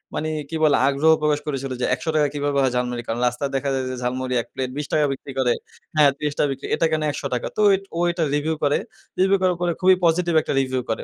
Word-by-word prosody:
মানে 155 - -2 0.2
কি 165 - -5
বলে, 150 - +5
আগ্রহ 140 +3 +3
প্রকাশ 150 -1 +2
করেছিল 135 -2 -3
যে, - - +2
"৳১০০ 155 -1 0
কিভাবে 145 -1 -1
হয় 130 - +2
ঝালমুড়ি?" 125 -1 -2
কারণ, 115 +1 -2
রাস্তায় 135 +3 -2
দেখা 140 +1 -1
যায় 130 -1 -1
যে - - -4
ঝালমুড়ি 125 +1 -2
এক - - -13
প্লেট 130 -1 -3
৳২০ 150 0 +1
বিক্রি 135 +1 -9
করে। 125 -2 +3 0.4
হ্যাঁ? 150 -2 +6
৳৩০ 150 0 0
বিক্রি। 135 +1 -6
এটা 165 - +1
কেন 155 - 0
৳১০০? 135 -4 -3
তো 215 - +2
ইট 195 - -6
ও - - -1
এটা 170 -1 -1
রিভিউ 155 +2 0
করে। 145 0 +3 0.4
রিভিউ 195 +1 +4
করার 180 -1 +2
পরে 175 - +1
খুবই 185 0 +6
পজিটিভ 170 +1 +2
একটা - - -3
রিভিউ 130 -1 -1
করে। 110 - -2
145 Hz, 230 wpm, -22 LUFS, 130-160 Hz, 0.4 s, হ্যাঁ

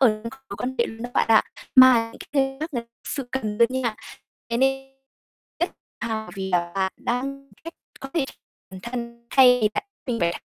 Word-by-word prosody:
mối 215 -5 +4 0.4
quan 255 +1 -2
hệ 235 - +3
luôn 225 +1 -8
đó 245 - -5
bạn - - +3
ạ. 225 - +7 0.3
Mà 255 -3 +8
những - - -13
cái 270 -1 +1
khác 315 - -2
lại 235 - -1
thực 235 - -27 0.2
sự 270 -4 -3
cần 215 -5 -2
đó 235 - +8
nha. 255 -4 -1 0.6
Thế 235 - +1
nên 270 +1 +1 0.7
rất 345 - +1 0.3
hào 220 -4 -3
vì 190 -1 -4
là 175 -1 +1
bạn 190 -1 0
đang 275 +3 -3 0.2
giúp 330 - -7 0.3
có 270 - -6
thể 320 -5 +2 0.5
bản 190 - -9
thân 235 -1 -6
thay 250 -2 +7
vì 210 - +5
bạn - - -1 0.2
mình 235 -2 -1
phải 170 0 0
240 Hz, 200 wpm, -24 LUFS, 220-270 Hz, 0.7 s, Mà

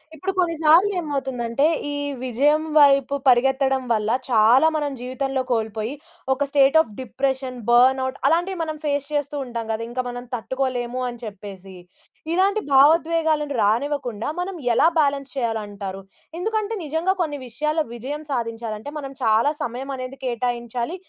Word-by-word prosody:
ఇప్పుడు 375 +6 -3
కొన్నిసార్లు 335 +2 +4
ఏమవుతుందంటే, 270 -4 -1 0.3
ఈ - - -2 0.3
విజయం 285 +5 +2
వైపు 280 -1 +5
పరిగెత్తడం 265 +1 +3
వల్ల 215 -1 +1 0.2
చాలా 240 +6 +5
మనం 295 -2 -1
జీవితంలో 260 +1 -2
కోల్పోయి 220 0 -1 0.4
ఒక 285 +2 -1
స్టేట్ 280 +2 +5
ఆఫ్ 220 -10 -7
డిప్రెషన్, 260 0 -2
బర్న్‌ఔట్ 260 +2 +4
అలాంటివి 350 +4 +1
మనం 310 -1 -4
ఫేస్ 285 -1 0
చేస్తూ 290 0 -1
ఉంటాం 235 -2 -5
గదా! 220 +1 -2
ఇంకా 255 +1 -2
మనం 245 0 -6
తట్టుకోలేము 255 0 -2
అని 240 - -9
చెప్పేసి 195 -2 -9 0.6
ఇలాంటి 395 +4 +2
భావోద్వేగాలను 310 +1 +3
రానివ్వకుండా 240 0 -1
మనం 370 +1 -3 0.2
ఎలా 310 - +5
బ్యాలన్స్ 280 -3 +1
చేయాలంటారు? 205 -5 -3 0.4
ఎందుకంటే 435 +2 -1
నిజంగా 320 +5 0
కొన్ని 295 -3 -2
విషయాల్లో 305 +6 -1
విజయం 280 +6 -6
సాధించాలంటే 230 -1 -4
మనం 275 -2 -6
చాలా 225 +6 +3
సమయమనేది 260 +1 -5
కేటాయించాలి. 240 +3 -2
265 Hz, 130 wpm, -22 LUFS, 235-300 Hz, 0.6 s, వైపు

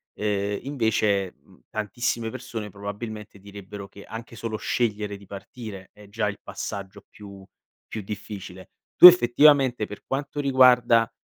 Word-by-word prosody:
ehm, 100 -1 -2
invece, 110 -7 0
uhm, - - -22
tantissime 115 +2 -2
persone 115 -3 -7
probabilmente 105 +1 -8
direbbero 100 0 -10
che 100 - -13
anche 115 +1 -9
solo 115 -1 -4
scegliere 105 -3 -2
di 100 - -16
partire 100 -1 -10
è 105 0 -16
già 105 0 -1
il 100 - -7
passaggio 100 0 -7
più 100 -2 -13 0.4
più 110 - -6
difficile. 100 -2 -8 0.3
Tu - - +10
effettivamente, 135 -6 +5
per 105 - -11
quanto 140 +2 -4
riguarda 125 -4 +4
105 Hz, 135 wpm, -24 LUFS, 100-120 Hz, 0.4 s, Tu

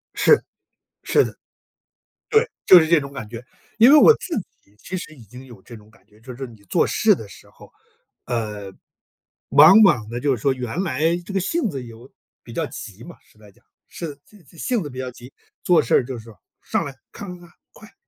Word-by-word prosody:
是 450 - +4 0.6
是 - - +3
的。 - - -8 0.9
对， 445 +2 +3 0.2
就 185 - +9
是 160 - +1
这 170 -1 +4
种 140 -1 -8
感 110 - -7
觉， 115 +1 -9 0.3
因 235 +4 +7
为 305 - +8
我 460 - +8
自 335 - -5 0.3
己 100 - -30
其 185 - -7
实 165 -3 -9
已 120 - -15
经 125 +5 -13
有 120 -7 -15
这 120 - -12
种 105 0 -19
感 110 -4 -26
觉， 105 0 -24
就 125 +1 -10
是 135 +2 -6
你 110 -4 -17
做 - - +2
事 - - +2
的 - - -10
时 - - -16
候， - - -18 0.5
呃， 105 -5 -4 0.8
往 155 - +8
往 120 - +3
呢 120 - -5
就 140 +1 +1
是 110 - -11
说 135 +1 +2
原 125 +7 -4
来 165 +1 0
这 200 - -8
个 195 - +1
性 300 - -1
子 135 -6 -6
有 115 +2 -14 0.3
比 - - -12
较 - - -2
急 - - -10
嘛， - - -12
实 - - -27
在 105 -2 -17
讲， - - -30 0.2
是 160 -4 -7
自 210 -4 -21
自 165 +4 -21
性 235 +2 -1
子 145 - -7
比 130 -1 -9
较 130 -1 -4
急， 125 +2 -15 0.3
做 175 -2 +4
事 - - +1
儿 - - +2
就 130 -1 -6
是 - - -13
说， 115 -2 -15 0.2
上 - - -2
来， 140 - -7 0.2
咔 205 - -9
咔 180 - -7
咔， 170 - -26 0.2
快， 220 - -16
做！ - - -24
135 Hz, 245 characters per minute, -21 LUFS, 115-180 Hz, 0.9 s, 就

